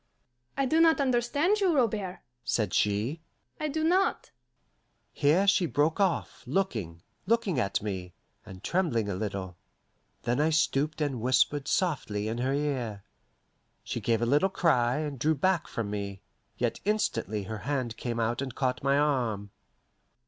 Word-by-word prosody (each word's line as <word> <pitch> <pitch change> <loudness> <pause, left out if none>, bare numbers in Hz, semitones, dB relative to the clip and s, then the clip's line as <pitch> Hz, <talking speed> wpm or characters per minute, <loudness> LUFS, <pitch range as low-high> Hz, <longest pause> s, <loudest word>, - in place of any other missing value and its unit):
"I 275 - +2
do 315 +5 +3
not 325 -1 +5
understand 280 - +2
you, 370 -5 +3
Robert," 210 -8 0 0.2
said 110 -3 0
she. 105 +10 +1 0.4
"I 305 - -1
do 310 +2 -2
not 365 +4 +1 0.4
" - - -45 0.3
Here 155 +7 +3
she 195 -3 +4
broke 150 +3 +1
off, 190 -4 0
looking, 105 - -2 0.2
looking 215 - +2
at 100 -3 0
me, 95 -4 -5 0.3
and 95 -3 -12
trembling 145 - 0
a - - -1
little. 95 -3 -4 0.7
Then 120 +3 0
I 155 - +3
stooped 155 -1 +1
and 135 -6 -1
whispered 130 +3 +2
softly 120 - 0
in 115 +2 -2
her 130 +2 0
ear. 130 -8 -2 0.8
She - - -4
gave 115 0 +1
a - - +3
little 145 +10 +3
cry, 125 -10 +2
and 150 -4 -3
drew 155 +5 +2
back 180 +3 +1
from 110 -3 -4
me; 100 -1 -5 0.3
yet 120 0 -1
instantly 115 - 0
her 110 +3 -5
hand 130 -3 -2
came 120 -1 -3
out 115 +3 0
and 130 -3 -5
caught 130 -1 -1
my 140 +1 +3
arm. 120 -9 0
135 Hz, 155 wpm, -29 LUFS, -, 0.8 s, not